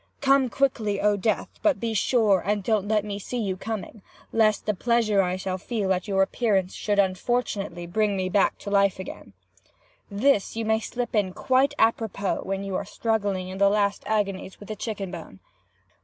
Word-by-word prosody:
'Come 275 -2 +3
quickly, 225 -7 0
O 210 0 +3
death! 205 +1 0
but 305 -4 +2
be 230 -1 -2
sure 215 -3 +3
and 205 +1 0
don't 210 -1 +1
let 210 -1 +1
me 205 -1 -4
see 245 +5 -5
you 200 -5 -1
coming, 215 +1 -6 0.3
lest 215 -2 +3
the 210 - +1
pleasure 220 -1 +2
I 180 -1 0
shall 185 0 -3
feel 200 -3 -1
at 185 +4 -3
your 195 -1 +3
appearance 195 -3 0
should 205 -1 -1
unfortunately 195 -2 0
bring 205 +3 0
me 185 -1 -1
back 195 +1 +3
again - - -39
to 205 - -6
life.' 200 -2 +3 1.1
This 205 0 +1
you 225 0 -2
may 220 0 +2
slip 245 +2 -4
in 195 -3 +1
quite 260 +6 +2
a 225 - +5
propos 205 -4 -3
when 195 0 -2
you 195 -1 -4
are - - -3
struggling 205 -3 -1
in 190 +1 -7
the 200 0 +5
last 200 0 +1
agonies 195 -3 -2
with 205 - -12
the 215 - -3
chicken 205 -3 -4
bone. 160 - -9
205 Hz, 190 wpm, -25 LUFS, 195-225 Hz, 1.1 s, a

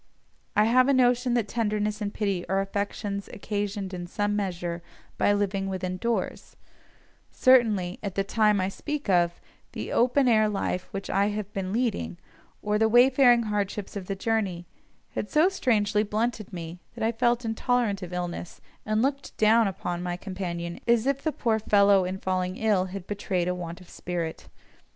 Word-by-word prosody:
I 210 - +5
have 255 +3 +4
a 280 - +4
notion 245 -1 +3
that 230 -3 +1
tenderness 210 -1 -1
and 205 -1 -2
pity 200 -4 -1
are 190 +1 +2
affections 200 0 -3
occasioned 205 -2 -3
in 175 -1 -5
some 205 +3 -1
measure 175 -4 -3 0.4
by - - +4
living 200 -1 0
within 185 -1 -3
doors; 235 +4 -3 0.7
certainly, 215 -8 +3
at 200 -3 -5
the 195 - +1
time 210 0 +2
I 185 - +1
speak 295 +6 -4
of, 175 -1 +2 0.3
the - - -5
open 255 +2 +3
air 215 -2 +4
life 195 -3 -2
which 195 0 -5
I 200 +1 +2
have 210 -1 -4
been 190 -1 -3
leading, 205 - -1 0.5
or 210 0 +1
the 220 0 +3
wayfaring 245 0 +6
hardships 210 -1 -3
of 190 -3 -5
the 195 - -2
journey, 195 -4 -1 0.5
had 210 - -4
so 315 +5 +4
strangely 215 - +1
blunted 215 0 -2
me, 170 -1 -7 0.2
that - - -4
I 225 - +2
felt 240 +1 +1
intolerant 225 -2 0
of 180 -1 -7
illness, 175 -1 -5 0.3
and 215 +2 +2
looked 275 +1 -2
down 220 +1 +5
upon 175 -2 -3
my 175 0 -3
companion 175 -3 -5
as 235 -1 +3
if 275 0 0
the 315 - 0
poor 225 -6 0
fellow 200 -2 +4
in 185 +1 -3
falling 185 -1 -2
ill 210 -4 +2
had 190 -1 -7
betrayed 190 -3 -2
a 180 - +1
want 175 -1 -6
of 180 - -15
spirit. 170 -3 -5
205 Hz, 175 wpm, -26 LUFS, 185-225 Hz, 0.7 s, wayfaring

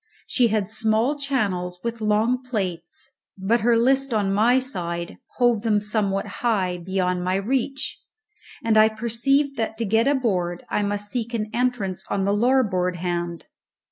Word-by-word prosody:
She 245 -3 +3
had 215 -3 0
small 220 +5 +1
channels 200 -11 -2
with 235 -1 -4
long 220 +4 +2
plates, 250 - -4 0.3
but 210 +5 +1
her 235 +1 +4
list, 265 +1 +2
on 200 -2 +1
my 230 +5 +4
side, 170 -10 -3 0.2
hove 240 -4 +3
them 215 -2 +2
somewhat 205 -2 0 0.2
high, 190 -7 0
beyond 180 0 -1
my 185 +1 0
reach, 265 +6 -2 0.6
and 220 -1 +4
I 215 0 +6
perceived 240 +6 0
that 225 -1 -2
to 230 - -1
get 225 +4 +2
aboard 190 -11 0
I - - +1
must 205 0 -2
seek 235 -1 -3
an 215 -1 -3
entrance 240 -7 -1
on 195 - 0
the 200 +1 +1
larboard 205 -6 +2
hand. 175 -1 -3
220 Hz, 155 wpm, -23 LUFS, 190-245 Hz, 0.6 s, I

